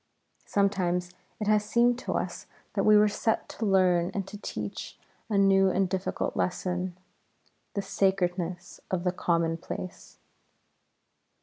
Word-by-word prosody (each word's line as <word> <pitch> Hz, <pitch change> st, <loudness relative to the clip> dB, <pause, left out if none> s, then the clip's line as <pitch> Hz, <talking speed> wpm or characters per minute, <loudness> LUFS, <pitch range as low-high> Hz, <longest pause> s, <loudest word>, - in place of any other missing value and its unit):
Sometimes 180 Hz, -3 st, +1 dB, 0.3 s
it 210 Hz, -, -2 dB
has 210 Hz, 0 st, +3 dB
seemed 240 Hz, +3 st, +3 dB
to -, -, -3 dB
us -, -, -3 dB, 0.3 s
that -, -, 0 dB
we 215 Hz, 0 st, +7 dB
were 210 Hz, 0 st, +6 dB
set 220 Hz, +2 st, 0 dB
to 220 Hz, -, -3 dB
learn 180 Hz, -3 st, +3 dB
and 195 Hz, -1 st, -2 dB
to 210 Hz, -, -9 dB
teach 105 Hz, -, -6 dB, 0.3 s
a 210 Hz, -, +1 dB
new 195 Hz, -1 st, +5 dB
and 190 Hz, +1 st, +2 dB
difficult 185 Hz, 0 st, -2 dB
lesson, 180 Hz, 0 st, -1 dB, 0.8 s
the 200 Hz, -, -1 dB
sacredness 180 Hz, -2 st, -1 dB
of 180 Hz, -2 st, -1 dB
the 180 Hz, -, +2 dB
commonplace. 170 Hz, 0 st, -2 dB
190 Hz, 130 wpm, -28 LUFS, 180-205 Hz, 0.8 s, we